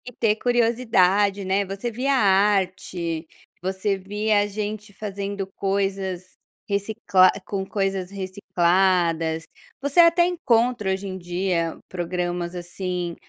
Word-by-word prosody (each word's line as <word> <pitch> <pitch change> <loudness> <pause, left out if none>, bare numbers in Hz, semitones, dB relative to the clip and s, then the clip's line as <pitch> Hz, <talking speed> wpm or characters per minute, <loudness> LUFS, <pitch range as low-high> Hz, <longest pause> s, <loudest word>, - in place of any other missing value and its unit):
E 250 - -7
ter 225 -3 +1
curiosidade, 215 -5 +2
né, 190 +2 +1
você 195 +5 -4
via 260 +5 0
arte, 190 -6 +1 0.3
você 190 +2 -1
via 205 +2 0
gente 210 +1 -5
fazendo 200 -1 -4
coisas, 195 -2 -2 0.4
reciclar 200 -2 +3 0.2
com 195 -1 -3
coisas 195 -2 -2
recicladas, 180 -4 +1 0.4
você 285 +4 0
até 340 0 +6
encontra 245 - +1
hoje 190 +1 -3
em 190 0 -5
dia 175 -1 -1
programas 175 0 -3
assim, 175 0 -4
195 Hz, 110 wpm, -23 LUFS, 180-210 Hz, 0.4 s, até